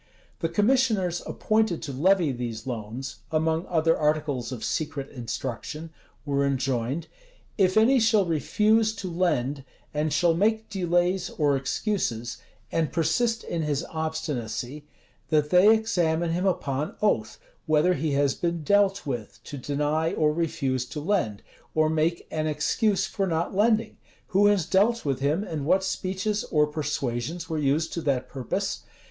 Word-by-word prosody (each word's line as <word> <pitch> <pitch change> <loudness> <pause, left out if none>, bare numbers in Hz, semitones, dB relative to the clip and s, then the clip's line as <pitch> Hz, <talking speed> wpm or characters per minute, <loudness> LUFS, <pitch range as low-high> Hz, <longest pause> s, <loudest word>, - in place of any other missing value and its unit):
The 165 - -1
commissioners 210 -3 +2
appointed 215 -6 0
to 140 - -5
levy 175 +2 +3
these 120 -2 -5
loans, 120 +2 -5
among 160 +2 0
other 165 -1 +2
articles 150 -5 0
of 120 -4 -6
secret 150 -3 -3
instruction, 130 +5 -5 0.3
were 140 -1 +1
enjoined, 135 +1 -1 0.5
"If 185 -1 +2
any 250 +5 +5
shall 220 -3 +4
refuse 215 +7 +2
to 190 -3 -5
lend, 145 -6 0 0.3
and 150 +1 0
shall 165 +3 +3
make 220 +5 +1
delays 180 0 +1
or 145 -3 +1
excuses, 130 - -2 0.3
and 160 -3 0
persist 225 +8 +1
in 170 - -3
his 150 0 -1
obstinacy, 150 -4 -4 0.4
that 150 -2 +2
they 185 +4 +7
examine 175 -7 +1
him 180 +3 0
upon 145 -5 -1
oath, 210 - +1 0.3
whether 155 +3 +4
he 150 -1 -1
has 140 -1 +2
been 170 -2 -2
dealt 200 +3 +3
with 120 -7 -5
to 145 - -8
deny 150 +4 -1
or 150 -1 +2
refuse 135 -6 -1
to 150 - -6
lend, 150 - -1 0.3
or 155 0 +3
make 160 +2 0
an 155 0 -1
[excuse] 190 +7 +1
for 195 0 -2
not 165 +1 -1
lending? 220 +2 +2 0.3
Who 205 0 +4
has 205 -5 +3
dealt 215 +5 +2
with 135 -3 0
him, 150 +8 +1
and 155 -8 -4
what 190 +6 +3
speeches 190 +3 -2
or 150 -1 +3
persuasions 150 +1 -3
were 160 -2 -2
used 150 +3 +1
to 170 - -3
that 130 -4 -1
purpose? 130 -3 -3
160 Hz, 150 wpm, -26 LUFS, 140-190 Hz, 0.5 s, they